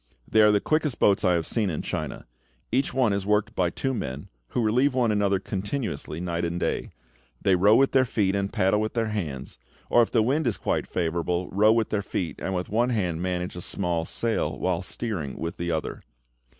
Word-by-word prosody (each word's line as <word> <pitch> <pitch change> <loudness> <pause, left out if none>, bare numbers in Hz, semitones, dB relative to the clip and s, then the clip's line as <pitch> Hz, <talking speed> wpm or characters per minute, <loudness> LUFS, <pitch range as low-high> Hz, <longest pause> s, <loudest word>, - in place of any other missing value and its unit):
They 110 - +4
are 105 - +7
the 105 - +3
quickest 155 0 0
boats 100 +1 +3
I 90 -2 +4
have 85 -1 -1
seen 110 -4 0
in 80 - -3
China. - - -4 0.5
Each 130 +4 +1
one 125 -6 +2
is 100 -1 -1
worked 105 +1 +1
by 90 -2 +1
two 135 +9 -2
men, 70 - -5 0.2
who 120 - -1
relieve 125 +5 +2
one 120 -4 +2
another 100 -2 +2
continuously 100 - -4
night 85 -1 -2
and 85 +1 -2
day. - - -1 0.5
They 95 - +3
row 100 +4 +5
with 135 +2 +4
their 130 - +5
feet, 100 -5 0
and 100 0 -1
paddle 95 +3 +2
with 110 +2 -3
their 115 -2 0
hands; 75 - -5 0.3
or 120 - +6
if 115 - +2
the 115 - +3
wind 140 +5 +1
is 115 - 0
quite - - -1
favourable, 85 +1 -1
row 105 +3 +5
with 115 -1 +1
their 105 - +1
feet, 90 -3 -4
and 95 - -2
with 90 0 -2
one 120 +4 +1
hand 90 -8 -1
manage 90 -1 -2
a 90 - -6
small 90 -3 -1
sail, 110 -6 -1
while 90 -2 0
steering 90 - -4
with 85 +1 -4
the 85 0 -3
other. 80 -2 -3
100 Hz, 215 wpm, -26 LUFS, 90-115 Hz, 0.5 s, are